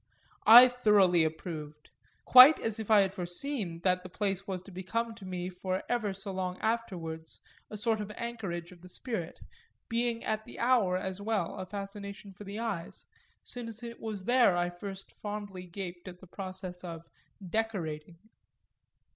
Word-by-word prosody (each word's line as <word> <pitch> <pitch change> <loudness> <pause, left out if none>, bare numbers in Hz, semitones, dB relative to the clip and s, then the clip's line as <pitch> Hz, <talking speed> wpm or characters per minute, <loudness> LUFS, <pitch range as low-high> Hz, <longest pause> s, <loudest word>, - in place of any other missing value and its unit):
I 240 +3 +12
thoroughly 210 -8 +4
approved 155 -2 -5 0.3
quite 255 +5 +10
as 225 -1 -2
if 220 - -5
I 215 -2 +7
had 190 -1 0
foreseen 180 0 -3
that 180 0 +2
the 185 - -10
place 195 0 -2
was 185 -2 -4
to 195 - -13
become 225 +6 -3
to 220 -3 -12
me 180 -1 -3
for 185 0 -3
ever 230 -4 0
so 195 +1 -5
long 185 -1 -3
afterwards 175 -8 -3 0.3
a 210 - -6
sort 220 0 0
of 210 - -5
anchorage 195 -8 -5
of 175 -2 -15
the 180 - -13
spirit, 215 -5 -5 0.5
being 235 0 0
at 215 0 -1
the - - -12
hour 235 -7 +3
as 190 +1 -4
well 205 -5 -1
a 185 - -5
fascination 200 0 -7
for 205 +3 -11
the 200 +2 -6
eyes, 225 -8 -4 0.4
since 230 -2 -6
it 235 0 -7
was 210 -4 -5
there 240 -7 +4
I 175 0 0
first 195 +2 -8
fondly 205 -3 -6
gaped 175 0 -7
at 180 -1 -9
the 190 - -13
process 185 -1 -7
of 165 -2 -7 0.4
"decorating." 175 -6 -3
195 Hz, 165 wpm, -31 LUFS, 180-220 Hz, 0.5 s, I